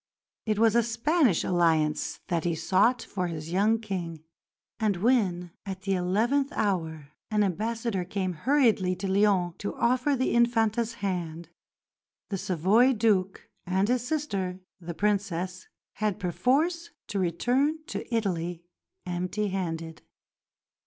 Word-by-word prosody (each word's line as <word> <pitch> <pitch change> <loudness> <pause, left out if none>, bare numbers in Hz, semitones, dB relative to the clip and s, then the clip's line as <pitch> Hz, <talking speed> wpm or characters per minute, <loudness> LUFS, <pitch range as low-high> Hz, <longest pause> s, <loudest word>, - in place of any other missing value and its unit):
It 215 -1 +1
was 225 0 +4
a 235 - +6
Spanish 235 - +2
alliance 160 -4 +1
that 170 -3 0
he 170 -1 0
sought 205 +9 +2
for 185 -3 -3
his 160 -1 -6
young 210 +5 +3
King; 175 -7 -5 0.6
and 210 -4 +1
when, 185 -5 +1
at 190 -1 -6
the 195 0 0
eleventh 225 +11 +1
hour, 160 -8 -2 0.2
an 210 -2 +2
ambassador 215 +1 -1
came 185 0 -2
hurriedly 220 - +2
to 195 +2 -4
Lyons 190 -3 +2
to 205 - -4
offer 255 +4 +2
the 260 0 0
Infanta's 230 -1 +2
hand, 170 -3 -3 0.8
the 195 - -1
Savoy 195 +11 +3
Duke 205 -5 +1 0.2
and 190 +2 +1
his 250 -1 +1
sister, 200 -11 -2 0.2
the 170 -1 -7
Princess, 185 -2 -1 0.3
had 210 -2 -1
perforce 300 - 0 0.2
to 200 - -3
return 255 - +1
to - - -6
Italy 175 -6 -1 0.4
"empty 180 +4 -2
handed." 165 -4 -4
195 Hz, 130 wpm, -27 LUFS, 175-230 Hz, 0.8 s, a